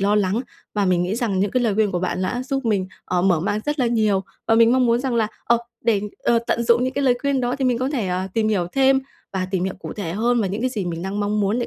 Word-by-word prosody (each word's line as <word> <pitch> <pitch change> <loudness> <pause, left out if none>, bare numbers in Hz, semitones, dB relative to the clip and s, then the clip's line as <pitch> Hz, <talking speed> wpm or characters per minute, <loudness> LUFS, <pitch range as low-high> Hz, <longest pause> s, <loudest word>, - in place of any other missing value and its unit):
lo 200 +1 +2
lắng 205 +2 +1 0.3
và 205 -1 +1
mình 180 -1 +2
nghĩ 185 +4 -1
rằng 215 -6 0
những 200 - +1
cái 250 +3 +1
lời 215 -4 +1
khuyên 215 -2 +2
của 175 - 0
bạn 185 0 -2
đã 245 +7 -1
giúp 270 0 -3
mình, 200 -4 +1 0.2
ờ, 180 -1 0
mở 180 -5 +3
mang 205 +4 -1
rất 295 0 -1
là 250 - +2
nhiều. 215 -4 +2 0.3
Và 225 - +4
mình 230 +1 +5
mong 255 -1 +3
muốn 235 +1 +2
rằng 255 -2 -1
là, 225 -2 +2 0.2
ờ, 235 0 +3 0.3
để, 220 -4 +3 0.2
ờ, 235 - +2
tận 235 - +1
dụng 235 +1 +3
những 260 - -1
cái 280 0 -1
lời 250 -2 +4
khuyên 280 -2 +1
đó 245 +1 -1
thì 270 - -1
mình 245 -2 +2
có 255 - 0
thể, 240 -10 -1
à, 185 +1 -2
tìm 220 -1 +2
hiểu 185 -5 +1
thêm 270 0 +4 0.3
và 185 -1 -1
tìm 185 -2 0
hiểu 190 - -2
cụ - - -6
thể 175 -6 -4
hơn 235 +4 +1
và 200 - +1
những 200 +4 -3
cái 255 0 0
gì 210 -6 -3
mình 170 -1 -4
đang 195 +2 -3
mong 210 +1 0
muốn 205 +4 +1
để 240 - -1
220 Hz, 310 wpm, -22 LUFS, 190-245 Hz, 0.3 s, mình